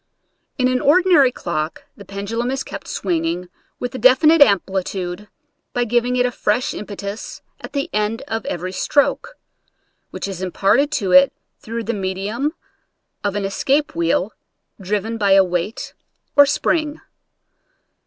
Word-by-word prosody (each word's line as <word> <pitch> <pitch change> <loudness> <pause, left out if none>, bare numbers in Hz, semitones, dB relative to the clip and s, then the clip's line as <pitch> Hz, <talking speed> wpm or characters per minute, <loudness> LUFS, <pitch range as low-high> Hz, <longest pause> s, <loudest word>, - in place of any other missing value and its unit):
In 255 -2 +2
an 255 0 0
ordinary 325 -4 +5
clock 160 -8 -4
the 200 - -12
pendulum 200 +5 -3
is 270 +1 -2
kept - - -8
swinging 175 -1 -2 0.3
with 245 - -4
a 260 - -5
definite 275 +6 +5
amplitude 190 -3 +1 0.5
by 245 - +1
giving 240 +1 +1
it 250 0 +2
a 250 - 0
fresh 230 +1 0
impetus 205 0 -7 0.2
at - - -9
the 280 -1 -1
end 215 +2 -1
of 225 -1 -3
every 180 +1 -3
stroke, 290 - 0 0.7
which - - -5
is 190 -2 -6
imparted 200 - +2
to 195 -9 -1
it 275 0 +7 0.3
through 230 +1 -5
the 230 +2 -2
medium 205 - -2 0.7
of 205 -1 -1
an 205 -1 -1
escape 275 +9 0
wheel, 170 +4 0 0.5
driven 210 +4 -2
by 200 -2 +4
a 195 0 +7
weight 180 +3 -3 0.4
or 285 -1 +7
spring. 300 +1 0
215 Hz, 145 wpm, -20 LUFS, 195-255 Hz, 0.7 s, it